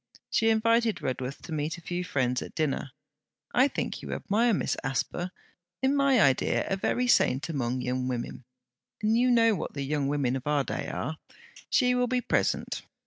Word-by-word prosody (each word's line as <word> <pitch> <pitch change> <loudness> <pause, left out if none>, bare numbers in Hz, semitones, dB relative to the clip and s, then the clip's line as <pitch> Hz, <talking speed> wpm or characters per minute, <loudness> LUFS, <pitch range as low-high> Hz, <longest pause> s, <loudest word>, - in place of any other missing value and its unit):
She 225 - +3
invited 225 -1 +2
Redworth 130 +1 -3
to - - -9
meet 155 +2 -2
a - - -12
few 175 +1 -3
friends 125 -7 0
at - - -8
dinner. 150 -3 -1 0.6
'I 260 +3 +5
think - - -4
you - - -5
admire 230 +4 +1
Miss 200 - 0
Asper: 140 +6 -2 0.5
in 270 +2 +3
my 275 -3 +4
idea 135 -9 +3
a 195 - 0
very 245 +6 0
saint 145 - +3
among 130 -4 -1
young 125 0 -1
women; 125 0 -4 0.6
and 215 +1 +3
you 250 +2 +3
know 230 -2 +5
what 185 - -4
the 140 - -2
young 140 0 -1
women 140 -3 0
of 135 +2 -5
our 145 -2 +2
day - - -4
are. 155 - -4 0.5
She 250 -2 +3
will 250 0 +2
be 250 +1 +1
present. - - 0
165 Hz, 185 wpm, -28 LUFS, -, 0.6 s, I